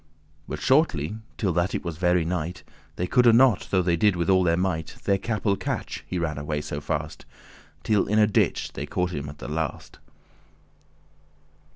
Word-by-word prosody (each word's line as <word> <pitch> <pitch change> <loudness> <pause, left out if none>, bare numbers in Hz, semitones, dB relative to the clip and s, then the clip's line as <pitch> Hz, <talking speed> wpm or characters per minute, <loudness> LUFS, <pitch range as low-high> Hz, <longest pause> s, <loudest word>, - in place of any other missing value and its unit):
*catch - - -36
But - - -5
shortly, 110 - +2 0.2
till 95 -5 0
that 85 +2 0
it - - -4
was 85 -3 -4
very 90 -1 +2
night 90 0 -3 0.3
They 90 - -1
coulde 120 +4 +5
not, 125 -5 +4
though 95 -2 +2
they 85 -1 +2
did 100 +3 +3 0.2
all 95 -1 +5
their 85 -2 +2
might, 85 -4 -2
Their 100 -1 +2
capel 105 -2 0
catch, 95 - -4
he 90 - -3
ran 80 -4 -2
alway 75 0 -2
so 75 0 -5
fast: 75 +1 -4 0.6
Till 105 -3 +2
in 105 - +1
a 105 - +6
ditch 105 - 0
they - - -5
caught 90 0 -1
him 70 -1 -4
at 75 - -10
the - - -8
last. 75 -1 -4
90 Hz, 185 wpm, -25 LUFS, 80-100 Hz, 0.6 s, a